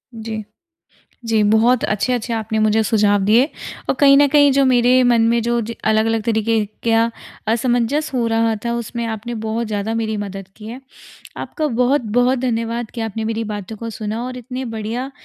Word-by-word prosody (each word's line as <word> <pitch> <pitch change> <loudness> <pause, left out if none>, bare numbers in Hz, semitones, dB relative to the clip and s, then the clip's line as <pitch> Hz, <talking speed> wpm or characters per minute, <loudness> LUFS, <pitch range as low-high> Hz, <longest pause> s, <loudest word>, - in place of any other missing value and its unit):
जी। 220 -1 -5 0.8
जी, 220 -1 +2
बहुत 225 +4 +3
अच्छे-अच्छे 235 +3 -1
आपने 220 0 -2
मुझे 215 +1 +3
सुझाव 205 -2 +2
दिए 225 +5 +5 0.5
और - - +2
कहीं 275 -1 +7
न 285 - +6
कहीं 285 0 +5
जो 275 +1 +3
मेरे 250 0 +4
मन 240 -2 +4
में 235 0 +2
जो 235 +1 0
ज 230 +2 -5
अलग-अलग 220 0 +1
तरीके 225 0 +1 0.2
के 230 - +1
अ, 230 +1 +3 0.4
असमंजस 245 +6 +1
हो 245 -2 0
रहा 225 0 +1
था, 235 - 0
उसमें 235 0 -4
आपने 225 +2 -5
बहुत 225 +1 -2
ज़्यादा 210 +1 -2
मेरी 220 -1 -2
मदद 195 -2 -6
की 215 0 -11
है। 250 +4 -8 0.6
आपका 310 -3 -3
बहुत-बहुत 245 -1 +2
धन्यवाद 235 -2 -2
कि 235 - -5
आपने 225 0 -3
मेरी 225 0 -2
बातों 205 +2 -7
को 230 +2 -6
सुना 220 +1 -4
और 255 0 -6
इतने 255 +1 -6
बढ़िया 230 +5 -4
230 Hz, 180 wpm, -19 LUFS, 220-245 Hz, 0.8 s, कहीं